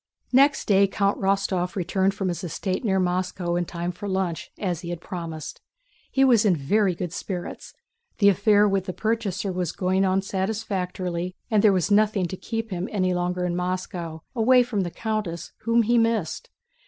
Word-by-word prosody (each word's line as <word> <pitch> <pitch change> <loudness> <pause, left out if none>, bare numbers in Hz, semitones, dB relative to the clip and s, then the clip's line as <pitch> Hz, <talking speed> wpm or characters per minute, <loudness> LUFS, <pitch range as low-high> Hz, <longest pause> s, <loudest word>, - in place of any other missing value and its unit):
Next 275 +3 +4
day 200 -1 +5
Count 200 +1 0
Rostóv 190 -2 0
returned 190 +1 0
from 195 -2 -1
his 175 - -4
estate 185 +4 -3
near 190 -4 +2
Moscow 180 -1 -1
in 175 0 0
time 170 +1 -4
for 190 +3 -7
lunch 190 -3 -2
as 180 -5 -2
he 170 - -6
had 175 -1 -4
promised. 165 -3 -7 0.5
He 270 - +3
was 240 -5 +5
in 200 -5 +4
very 185 +6 +1
good 175 -1 -4
spirits; 185 -3 -6 0.4
the 200 - +4
affair 205 +1 +5
with 195 -2 0
the 185 - -3
purchaser 205 -3 -1
was 180 -2 -2
going 185 +1 +1
on 190 0 +2
satisfactorily, 185 -3 -3 0.2
and 210 -2 +3
there 215 - +7
was 185 +1 0
nothing 210 -2 +3
to 185 - -4
keep 225 +2 -4
him 180 +1 -3
any 185 -3 +1
longer 180 0 -1
in 175 -1 -1
Moscow, 180 -3 -4
away 250 +2 +5
from 230 -5 -2
the 175 - -2
countess 210 -4 -3
whom 230 0 +4
he 235 +2 +3
missed. 225 - 0
190 Hz, 180 wpm, -25 LUFS, 180-210 Hz, 0.5 s, there